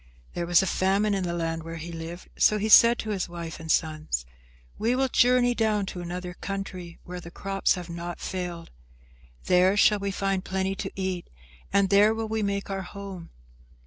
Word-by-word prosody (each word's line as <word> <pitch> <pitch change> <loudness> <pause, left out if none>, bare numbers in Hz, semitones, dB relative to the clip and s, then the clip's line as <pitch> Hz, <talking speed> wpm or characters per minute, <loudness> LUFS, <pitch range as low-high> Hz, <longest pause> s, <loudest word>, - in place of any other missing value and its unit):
There 175 -1 -3
was 175 +2 +5
a - - 0
famine 195 +3 +1
in 190 -2 -1
the 170 - -2
land 165 -1 -2
where 165 +1 -7
he 165 +1 -7
lived, 165 +2 -8
so 215 - +4
he 215 +1 -1
said 235 +2 +8
to 220 - -4
his 190 -3 -2
wife 170 -1 -7
and 160 -1 -3
sons, 155 - 0 0.5
"We 235 +3 +1
will 265 +1 +2
journey 245 0 +4
down 215 -3 +1
to 180 - -6
another 180 +1 -5
country 185 -3 -6
where 180 0 -7
the 170 - -10
crops 195 +2 0
have 180 -2 -7
not 170 0 -6
failed. 180 -3 -5 0.7
There 185 +2 +4
shall 210 0 +5
we 200 0 -2
find 195 -1 -1
plenty 190 0 -1
to 195 0 -5
eat, 185 -2 -3 0.4
and 200 -1 +2
there 205 +2 +5
will 225 0 -3
we 220 0 -1
make 200 -1 -2
our 195 0 -2
home." 190 -2 -8
190 Hz, 195 wpm, -26 LUFS, 175-200 Hz, 0.7 s, said